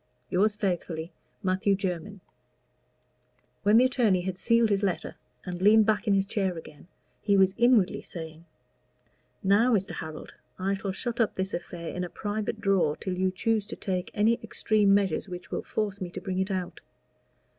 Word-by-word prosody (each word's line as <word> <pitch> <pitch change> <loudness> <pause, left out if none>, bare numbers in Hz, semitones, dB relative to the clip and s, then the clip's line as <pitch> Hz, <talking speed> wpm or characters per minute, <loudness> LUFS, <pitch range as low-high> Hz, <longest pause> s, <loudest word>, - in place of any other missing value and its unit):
Yours 205 +3 +3
faithfully, 175 -5 -2 0.3
MATTHEW 190 +1 +2
JERMYN. 195 +1 -4 1.4
When 210 +2 +5
the 250 - +6
attorney 230 -8 +2
had 185 0 -3
sealed 230 +4 +3
this 200 -1 +2
letter 195 -3 -2 0.3
and 180 -1 -5
leaned 215 +2 +6
back 215 0 +1
in 200 - +4
his 195 0 +2
chair 195 -3 -1
again, 155 0 -12 0.3
he 200 -2 +3
was 190 -1 +4
inwardly 235 -6 +3
saying 160 -1 -9 1.0
"Now, 205 +6 +4
Mr. 195 -2 -1
Harold, 155 -1 -7 0.2
I 190 +1 0
shall 195 0 -3
shut 235 +5 -4
up 225 - +1
this 190 0 -2
affair 170 -1 -5
in 180 - -3
a 180 - -4
private 205 +2 -3
drawer 185 -7 +2
till 185 -2 -4
you 185 +1 +1
choose 210 +2 0
to - - -5
take 185 -2 -3
any 225 +3 +3
extreme 215 -2 +2
measures 200 0 +2
which 180 0 -8
will - - -2
force 205 -2 -3
me 180 - -3
to 185 - -7
bring 185 -1 -3
it 190 +1 0
out. 185 -2 -4
195 Hz, 175 wpm, -27 LUFS, 180-210 Hz, 1.4 s, the